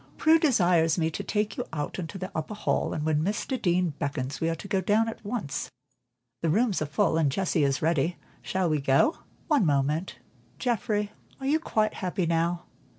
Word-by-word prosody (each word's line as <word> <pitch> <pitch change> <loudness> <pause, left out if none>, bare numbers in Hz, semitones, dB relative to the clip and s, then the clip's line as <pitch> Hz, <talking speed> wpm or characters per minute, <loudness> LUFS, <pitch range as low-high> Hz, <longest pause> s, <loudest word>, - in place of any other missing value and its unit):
"Prue 320 +1 +5
desires 175 - +3
me 165 -1 +1
to - - -4
take 210 -1 -1
you - - -2
out 150 +3 -4
into 180 +3 -5
the 185 0 -5
upper 155 +6 -4
hall, 210 - 0
and 150 - -3
when 155 -1 +2
Mr. 210 - -2
Deane 180 -2 +2
beckons, 140 -1 -3
we 165 - +2
are 165 - 0
to 185 - -9
go 195 -1 +1
down 215 +3 +2
at 225 - -6
once. 205 - -3 0.7
The 165 - +1
rooms 210 +2 +2
are 155 - -1
full, 160 +2 +1
and 145 -4 +2
Jessie 180 -1 +1
is 135 0 +1
ready. 165 +1 +1 0.2
Shall 185 -1 0
we 155 -3 +1
go?" 135 - +3 0.3
"One 295 -8 +3
moment: 145 0 0 0.4
Geoffrey, 210 -4 -1 0.3
are 270 - -6
you 300 +4 +3
quite 215 -8 0
happy 180 -1 -2
now?" 170 +1 0
175 Hz, 195 wpm, -27 LUFS, 155-210 Hz, 0.7 s, Prue